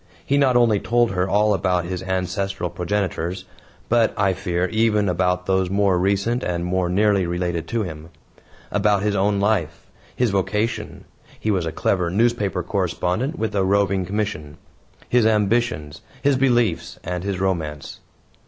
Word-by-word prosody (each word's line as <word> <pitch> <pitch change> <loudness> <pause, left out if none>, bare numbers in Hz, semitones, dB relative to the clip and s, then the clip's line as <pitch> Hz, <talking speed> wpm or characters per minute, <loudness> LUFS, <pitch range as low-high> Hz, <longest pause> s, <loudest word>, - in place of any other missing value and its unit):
He 140 - +1
not 135 -3 +4
only 115 -4 +4
told 120 0 +1
her 90 0 -1
all 105 +1 +3
about 90 -2 0
his 90 0 -4
ancestral 95 0 -2
progenitors, 90 0 -2 0.4
but, 115 -1 +2
I 100 -2 +2
fear, 90 -2 -1
even 110 -2 +2
about 90 0 0
those 95 -1 +1
more 100 -2 +2
recent 100 +6 +1
and 85 -1 -2
more 90 0 0
nearly 100 -1 +2
related 85 -1 -2
to 115 -2 -1
him; 80 -3 -8 0.6
about 105 -1 +2
his 105 -1 0
own 100 +1 +1
life, 100 -6 0 0.3
his 125 -4 +1
vocation 105 +3 -2 0.3
he 110 - 0
was 90 -5 0
a - - -2
clever 90 0 0
newspaper 100 -2 +1
correspondent 95 - -1
with 110 - -2
a 100 -2 +1
roving 100 -1 +2
commission 90 -7 -4 0.5
his 120 -2 +3
ambitions, 105 -8 0 0.2
his 140 -1 +3
beliefs 120 -8 +1
and 90 0 -4
his 100 -2 -2
romance. 80 -6 -3
95 Hz, 155 wpm, -22 LUFS, 90-105 Hz, 0.6 s, not